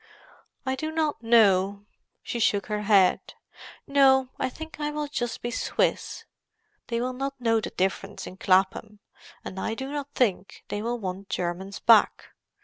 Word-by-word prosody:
"I 260 - 0
do 310 +4 -3
not 315 -5 -1
know." 200 -3 +3 0.4
She 240 - -4
shook 205 -3 +2
her 210 -1 -3
head. 200 -3 +3 0.5
"No, 265 -2 +4
I 260 - 0
think 320 +4 -10
I 295 0 -1
will 300 0 -3
just 240 -5 -4
be 240 - -2
Swiss. - - -1 0.6
They 235 -1 -1
will 250 +1 -2
not 275 +1 -4
know 225 -2 +2
the - - -4
difference 195 +2 -2
in 185 - -9
Clapham. 190 +3 +1 0.5
And 190 - -6
I 225 - -2
do 265 +3 -6
not 290 -1 -4
think 200 -6 -1
they 205 - -3
will 240 +2 -2
want 195 -2 -6
Germans 185 +3 -3
back. 225 -3 +4
225 Hz, 160 wpm, -26 LUFS, 195-265 Hz, 0.6 s, No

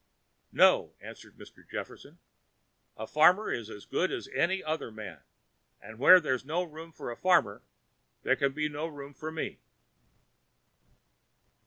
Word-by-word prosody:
"No," - - +4
answered - - -13
Mr. - - -15
Jefferson. - - -8 0.8
"A 110 - -5
farmer 175 - +4
is 115 -2 -4
as 105 -2 -10
good 185 - -1
as - - -5
any 190 +2 0
other 155 -4 -3
man; 105 -8 -9 0.6
and 110 +1 -13
where 180 +7 +9
there's 130 -7 -2
no 160 +6 -1
room 165 0 -10
for 140 - -7
a - - -6
farmer, 170 - +2 0.6
there - - +2
can 140 0 0
be 150 +2 -2
no 150 +2 -4
room 145 -2 -10
for 155 +3 -7
me." 160 - -5
150 Hz, 145 wpm, -29 LUFS, 120-165 Hz, 0.8 s, where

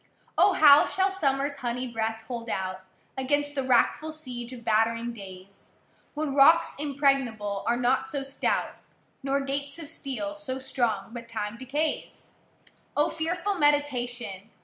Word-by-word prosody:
O! 400 - +5
how 295 -3 +7
shall 385 +1 +1
summerâs 285 -5 0
honey 250 0 -3
breath 225 0 -2
hold 235 -1 -5
out, 185 -1 -3 0.3
Against 290 +2 0
the 275 - -1
wrackful 260 +4 +2
siege 250 -6 -6
of 245 -2 -9
battering 230 +2 +1
days, 195 -2 -12 0.4
When 300 -2 -2
rocks 320 +5 +6
impregnable 270 -8 0
are 235 - +2
not 250 +2 +1
so 280 -2 -3
stout, 275 0 -1 0.4
Nor 275 0 0
gates 280 +1 -3
of 320 -4 -7
steel 300 -1 -4
so 290 -4 -5
strong 245 -4 -1
but 235 -1 -8
Time 215 -1 -3
decays? 290 +6 -3 0.7
O 295 +2 +3
fearful 355 +4 -2
meditation! 245 -8 0
265 Hz, 140 wpm, -27 LUFS, 235-290 Hz, 0.7 s, how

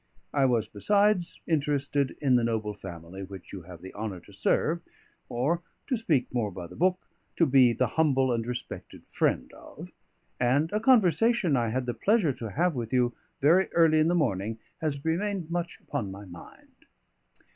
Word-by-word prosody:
I 140 -2 +3
was, 115 -4 +2
besides, 200 - +1
interested 145 -3 0
in 135 -4 +3
the 120 - +3
noble 110 -2 -1
family 90 -1 -9
which 95 -1 -10
you 95 - -6
have 85 -1 -11
the 95 - -9
honour 105 -3 -5
to 100 - -17
serve, 155 +11 +1 0.5
or 140 +9 0 0.2
(to 265 - 0
speak 160 - 0
more 115 -4 0
by 90 -2 -7
the 90 - -12
book) 185 +1 +1 0.3
to 165 - +4
be 130 -3 +5
the 125 +2 +1
humble 135 -1 +2
and 115 -1 -1
respected 125 0 -7
friend - - 0
of; - - -12 0.5
and 135 +6 +2
a 210 - +1
conversation 225 - +4
I 120 -3 +1
had 125 +3 -1
the 120 - -2
pleasure 200 - +2
to 115 -3 -6
have 175 - +1
with 120 -4 -4
you 125 -1 +2 0.3
very 170 +7 +4
early 160 -2 +5
in 155 - +4
the 175 - +2
morning 110 - 0 0.2
has 145 -2 -3
remained 175 0 -1
much 170 0 -3
upon 125 -9 -4
my 100 +2 -9
mind. 85 -2 -15
135 Hz, 180 wpm, -28 LUFS, 110-170 Hz, 0.5 s, be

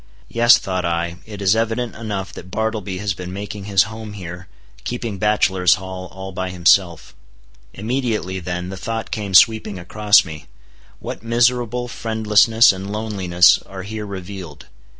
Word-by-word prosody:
Yes, 120 +1 +6
thought 95 -1 -3
I, 85 0 -2
it 105 -2 -7
is 95 +2 +4
evident 115 +1 -1
enough 100 -4 -5
that 90 - -10
Bartleby 110 -2 -3
has 100 0 -2
been 90 0 -8
making 100 +1 -6
his 100 -2 +4
home 110 0 -8
here, 90 -2 -8 0.4
keeping 115 -5 -4
bachelor's 95 -4 +3
hall 95 -1 -7
all 95 +1 -9
by 95 0 -4
himself. 85 -2 +2 0.6
Immediately 110 -4 -2
then 90 0 -4
the 95 - -7
thought 115 +3 -4
came 100 -3 -3
sweeping 110 0 +5
across 100 +4 +3
me, 80 -2 -9 0.5
What - - -7
miserable 120 +1 +1
friendlessness 110 -1 +3
and 95 +1 -7
loneliness 95 -5 +3
are 95 -1 -9
here 105 +1 -6
revealed! 95 -6 -8
100 Hz, 150 wpm, -20 LUFS, 90-110 Hz, 0.6 s, Yes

